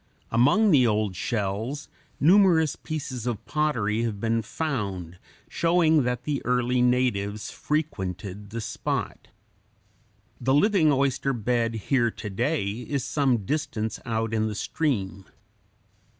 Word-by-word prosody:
Among 145 - +4
the 130 -6 +5
old 105 -3 0
shells 110 - -2 0.3
numerous 170 -3 +5
pieces 130 -6 -5
of 120 -4 -3
pottery 115 -8 0
have 110 -4 -2
been 115 +1 0
found, 100 - -4 0.3
showing 165 -2 +3
that 125 0 -2
the 145 0 -2
early 125 0 +1
natives 120 -5 0
frequented 100 - -3
the 115 +2 -5
spot. - - -3 1.1
The 130 +2 +2
living 180 -2 +4
oyster 135 0 +1
bed 115 0 0
here 120 +2 +1
to 110 -1 -7
day 120 +3 0
is 125 +4 -3
some 130 -8 +1
distance 130 -6 -2
out 115 -1 -2
in 110 0 +1
the 105 - -4
stream. 100 - -2
120 Hz, 120 wpm, -26 LUFS, 105-145 Hz, 1.1 s, the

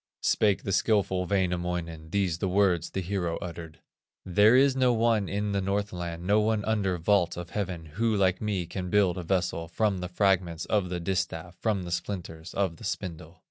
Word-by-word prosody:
Spake 105 -3 +2
the 100 - -2
skilful 95 -3 +1
Wainamoinen, 90 -4 -2
These 90 -3 0
the 95 - 0
words 95 -3 +2
the 95 - -3
hero 90 -2 -2
uttered: 85 -2 -8 0.4
"There 105 +6 +5
is 135 0 +5
no 130 -2 +3
one 115 -4 +2
in 105 +1 -1
the 100 -1 0
Northland, 90 -4 -3
No 105 +3 +4
one 110 -1 +1
under 100 -5 0
vault 85 0 +2
of 90 -1 -7
heaven, 95 -5 -3
Who 110 +8 0
like 95 -2 +2
me 100 -5 -1
can 90 +2 -5
build 95 -2 +2
a - - -5
vessel, 90 -2 -1
From 100 +2 0
the 90 0 -4
fragments 90 -3 +1
of 100 -4 0
the 90 -1 -3
distaff, 90 -1 -3
From 105 -4 0
the 90 - -6
splinters 85 -3 -5
of 95 -5 0
the - - -13
spindle." 85 -5 -5
95 Hz, 185 wpm, -28 LUFS, 85-100 Hz, 0.4 s, There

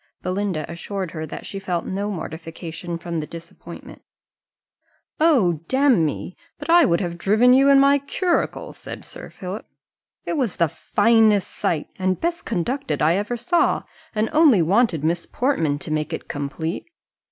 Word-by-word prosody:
Belinda 185 -4 -2
assured 185 +1 -5
her 160 -1 -5
that - - -8
she 195 - -5
felt 180 -3 -2
no 200 +2 -2
mortification 165 -1 -6
from 170 -1 -4
the 150 - -5
disappointment. 170 0 -11 1.2
"O, 225 - +3
damme! 250 - +2 0.2
but - - -3
I 345 0 +7
would 170 -1 +2
have 170 -2 -4
driven 220 +7 +4
you 270 +2 +5
in 275 -1 +7
my 280 +1 +5
curricle," 345 +5 -1
said - - -9
Sir - - -9
Philip: 190 +3 -7 0.6
"it 330 - -2
was 250 -9 -1
the 170 - +3
finest 210 +3 +3
sight 155 -3 -1
and 185 0 0
best 340 0 -2
conducted 245 - -2
I 155 +2 +4
ever 205 +6 -1
saw, 245 +9 +1 0.3
and 215 +1 +1
only 295 - +6
wanted 185 - +2
Miss 170 +2 0
Portman 165 - 0
to 155 - -6
make 155 +1 -1
it - - -5
complete. 150 +4 -4
190 Hz, 155 wpm, -22 LUFS, 165-245 Hz, 1.2 s, I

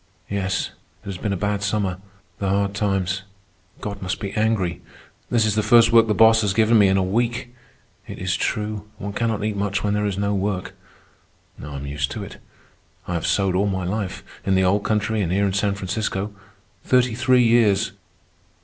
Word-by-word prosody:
"Yes, 95 -1 -1 0.3
it - - -25
has 95 -2 -5
been 105 - -2
a 100 - -1
bad 100 +1 -1
summer. 100 -3 -1 0.4
The 100 - -1
hard 100 0 +1
times. 95 -2 -1 0.6
God 100 -1 -5
must 95 0 -3
be 100 -3 -4
angry. 100 -6 0 0.5
This 115 -2 +3
is 105 - +1
the 110 - +2
first 115 +1 +5
work 115 -1 +6
the 105 - +1
boss 110 0 +6
has 100 -2 0
given 110 +1 +4
me 100 - +6
in 95 0 +3
a 95 - +2
week. 120 +5 -1 0.5
It 100 - -7
is 95 +1 -1
true, 105 0 -2
one 100 0 -5
cannot 110 -2 -1
eat 105 -1 -1
much 100 0 -1
when 105 -1 +1
there 105 0 0
is 100 -2 -2
no 100 0 0
work. 95 -1 -2 0.9
I 75 0 -7
am 70 +1 -6
used 70 0 -2
to - - -5
it. - - -10 0.7
I 90 - -3
have 85 -2 -1
sewed 95 -2 +2
all 100 +2 +2
my 95 -2 -2
life, 95 0 -3 0.2
in 95 - +1
the 95 - +3
old 100 +3 +2
country 110 0 0
and 85 -3 -1
here 100 +2 +2
in 95 - 0
San 100 0 +1
Francisco—thirty 105 +4 -2
three 125 +1 +3
years. 115 -4 +3
100 Hz, 195 wpm, -22 LUFS, 95-110 Hz, 0.9 s, work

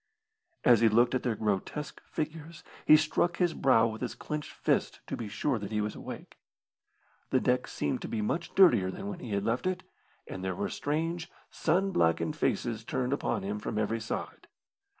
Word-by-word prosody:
As 120 -3 +7
he 115 0 +5
looked 120 +3 +4
at 130 - +1
their 120 -3 0
grotesque 105 +8 -2
figures 160 +1 -5 0.2
he 155 - +10
struck 155 +2 +1
his 175 -2 +2
brow 130 -6 +4
with 110 -1 -3
his 125 - -3
clenched 150 -1 -5
fist - - 0
to - - -4
be 115 - -5
sure 120 +4 -1
that 100 0 -6
he 105 - 0
was 105 0 -1
awake. - - -9 0.9
The - - +3
deck - - +1
seemed 75 - -2
to - - -4
be 115 - -3
much 160 +11 -2
dirtier 120 - +6
than 195 - -5
when 185 -3 -6
he 125 - -7
had 100 -1 0
left 120 +10 0
it, 185 -1 -2 0.4
and 95 - -7
there 95 -1 -2
were - - -2
strange, 165 +3 -2 0.2
sun 185 +5 +1
blackened 80 - +2
faces 115 -2 -1
turned 125 +3 -1
upon 140 - -1
him 105 +2 -3
from 105 - -4
every 110 +1 0
side. 110 - -5
120 Hz, 190 wpm, -30 LUFS, 105-155 Hz, 0.9 s, he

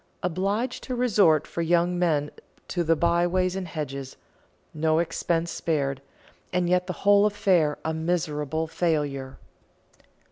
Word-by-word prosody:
Obliged 200 +8 -1
to 255 - -3
resort 200 - +3
for 170 - -4
young 175 +1 +2
men 150 -4 +1 0.4
to 175 - -1
the 165 0 +3
byways 175 +2 +1
and 190 -2 -4
hedges; 140 -4 -6 0.6
no 155 +1 +1
expense 170 0 -1
spared, 140 -4 -1 0.5
and 180 -1 +1
yet 180 0 +1
the 185 - -2
whole 205 +1 +6
affair 180 -7 +2
a 160 - 0
miserable 160 -2 -1
failure." 145 -5 -2
170 Hz, 130 wpm, -26 LUFS, 155-180 Hz, 0.6 s, whole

